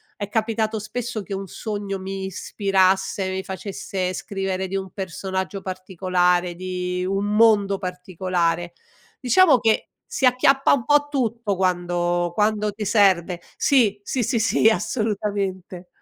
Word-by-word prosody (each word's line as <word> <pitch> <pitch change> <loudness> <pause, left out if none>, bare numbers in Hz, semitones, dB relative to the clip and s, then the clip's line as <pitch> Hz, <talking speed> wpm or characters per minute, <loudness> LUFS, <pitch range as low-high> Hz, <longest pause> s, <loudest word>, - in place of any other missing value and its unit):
è 205 -1 -5
capitato 220 -1 -1
spesso 225 +1 -4
che 200 - -7
un 195 0 -4
sogno 205 0 -4
mi 190 0 -5
ispirasse, 190 0 +1
mi 190 0 -3
facesse 190 -1 -4
scrivere 190 -1 -3
di 195 - -1
un 190 -1 -5
personaggio 190 +1 -4
particolare, 180 -1 0
di 180 0 -3
un 195 +1 -1
mondo 205 -3 +4
particolare. 180 -2 -2 0.5
Diciamo 265 +2 +5
che 225 -1 +1 0.2
si 470 - -1
acchiappa 270 +2 +4
un 250 -5 +2
po' 290 0 +3
tutto 230 -7 -1
quando 175 -1 0
quando 210 +1 +1
ti 210 +1 -5
serve. 190 -4 +3 0.2
Sì, 225 -8 +3
sì, 245 +3 -2
sì, 230 +1 0
sì, 220 0 +4
assolutamente. 200 -5 -2
195 Hz, 130 wpm, -23 LUFS, 185-220 Hz, 0.5 s, Diciamo